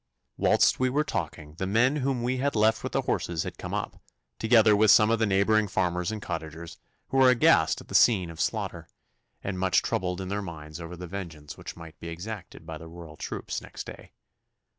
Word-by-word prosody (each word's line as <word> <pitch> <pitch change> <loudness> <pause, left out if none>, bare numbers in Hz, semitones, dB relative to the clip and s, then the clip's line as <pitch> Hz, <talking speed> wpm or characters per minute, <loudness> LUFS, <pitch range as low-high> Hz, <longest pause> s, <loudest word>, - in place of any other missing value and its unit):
Whilst - - +3
we 130 0 +2
were 145 +4 +1
talking 75 - -4
the 95 - -1
men 120 +8 +3
whom 130 -3 -1
we 125 +2 0
had 140 +1 0
left 110 +1 +3
with - - -5
the - - +1
horses 85 -2 -1
had - - -7
come - - -6
up, - - -4 0.4
together 110 -2 +5
with 105 +1 +4
some 105 +2 +7
of 115 - +2
the 110 - +2
neighbouring 105 +2 +3
farmers 90 -1 -1
and 110 - -4
cottagers, 80 -2 -6 0.3
who 135 - -1
were 130 -1 +7
aghast 125 -2 +4
at - - -15
the - - -10
scene 95 -8 +4
of 80 - -6
slaughter, - - -2 0.6
and 95 -2 -3
much 95 0 +2
troubled 90 0 -1
in 95 -1 -5
their 100 +1 -2
minds 80 -3 -8
over 85 +1 -7
the 90 - -7
vengeance 80 -5 -7
which - - -9
might 80 -1 -12
be 85 - -8
exacted 90 +1 -7
by 80 -1 -7
the 80 - -10
Royal 80 -2 -11
troops - - -5
next - - -8
day. - - -11
95 Hz, 210 wpm, -27 LUFS, 85-110 Hz, 0.6 s, some